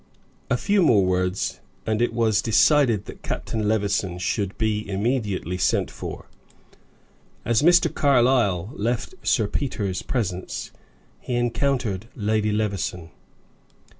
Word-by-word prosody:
A 125 Hz, -, +2 dB
few 200 Hz, +9 st, +2 dB
more 110 Hz, -, +4 dB
words, 90 Hz, +1 st, -1 dB, 0.3 s
and 110 Hz, +1 st, 0 dB
it 120 Hz, -, +2 dB
was 115 Hz, -2 st, +2 dB
decided 115 Hz, -2 st, +3 dB
that -, -, -10 dB
Captain 110 Hz, -2 st, -3 dB
Levison 100 Hz, -4 st, 0 dB
should 100 Hz, +2 st, -2 dB
be 105 Hz, -2 st, -1 dB
immediately 100 Hz, -4 st, -1 dB
sent 90 Hz, -, +1 dB
for. -, -, -7 dB, 1.2 s
As 120 Hz, -1 st, +2 dB
Mr. 175 Hz, +3 st, +4 dB
Carlyle 120 Hz, -, +2 dB
left 120 Hz, -, -2 dB
Sir 110 Hz, -, +2 dB
Peter's 100 Hz, -8 st, -2 dB
presence, 95 Hz, -7 st, -3 dB, 0.5 s
he 125 Hz, -, -4 dB
encountered 120 Hz, -4 st, -1 dB
Lady 110 Hz, -1 st, 0 dB
Levison. 100 Hz, -5 st, -2 dB
110 Hz, 115 wpm, -24 LUFS, 100-120 Hz, 1.2 s, more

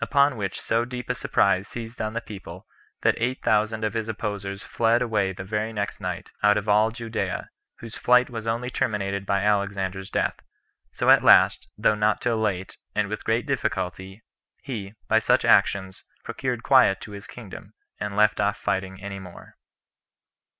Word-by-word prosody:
Upon 140 Hz, -1 st, +3 dB
which 100 Hz, -3 st, -4 dB
so 115 Hz, +1 st, 0 dB
deep 125 Hz, 0 st, -5 dB
a -, -, +1 dB
surprise 100 Hz, -5 st, +1 dB
seized 115 Hz, 0 st, -7 dB
on 110 Hz, 0 st, -2 dB
the 115 Hz, -, -2 dB
people, 95 Hz, -3 st, -10 dB, 0.4 s
that -, -, +5 dB
eight 130 Hz, +3 st, -1 dB
thousand 110 Hz, +1 st, +1 dB
of 105 Hz, -1 st, 0 dB
his 115 Hz, -1 st, -2 dB
opposers 100 Hz, -2 st, -4 dB
fled 115 Hz, +1 st, +2 dB
away 110 Hz, -6 st, 0 dB
the 95 Hz, 0 st, -7 dB
very 105 Hz, +3 st, -2 dB
next 100 Hz, -2 st, -3 dB
night, -, -, -5 dB
out 105 Hz, 0 st, +5 dB
of 105 Hz, 0 st, -3 dB
all 105 Hz, +2 st, +4 dB
Judea, 115 Hz, -4 st, -4 dB, 0.3 s
whose 115 Hz, 0 st, -8 dB
flight 125 Hz, 0 st, +5 dB
was 115 Hz, -2 st, -6 dB
only 120 Hz, +2 st, -1 dB
terminated 100 Hz, -4 st, -2 dB
by 100 Hz, -1 st, +1 dB
Alexander's 100 Hz, -2 st, -1 dB
death; -, -, -1 dB, 0.5 s
so -, -, +3 dB
at -, -, +6 dB
last, -, -, +5 dB
though 110 Hz, -, +3 dB
not 105 Hz, 0 st, +1 dB
till 120 Hz, -2 st, 0 dB
late, 95 Hz, -4 st, -2 dB, 0.2 s
and 105 Hz, -1 st, 0 dB
with 105 Hz, 0 st, -4 dB
great 115 Hz, +2 st, 0 dB
difficulty, 95 Hz, -6 st, -3 dB, 0.4 s
he, 110 Hz, -6 st, -6 dB
by -, -, +4 dB
such -, -, +2 dB
actions, 95 Hz, -1 st, +3 dB, 0.2 s
procured -, -, -3 dB
quiet -, -, +5 dB
to -, -, -9 dB
his 100 Hz, +1 st, -9 dB
kingdom, 115 Hz, -6 st, -11 dB, 0.2 s
and 105 Hz, 0 st, -4 dB
left 105 Hz, 0 st, +4 dB
off 100 Hz, 0 st, +1 dB
fighting 95 Hz, -1 st, -2 dB
any 100 Hz, -1 st, -5 dB
more. 90 Hz, -2 st, -12 dB
105 Hz, 175 wpm, -25 LUFS, 100-115 Hz, 0.5 s, at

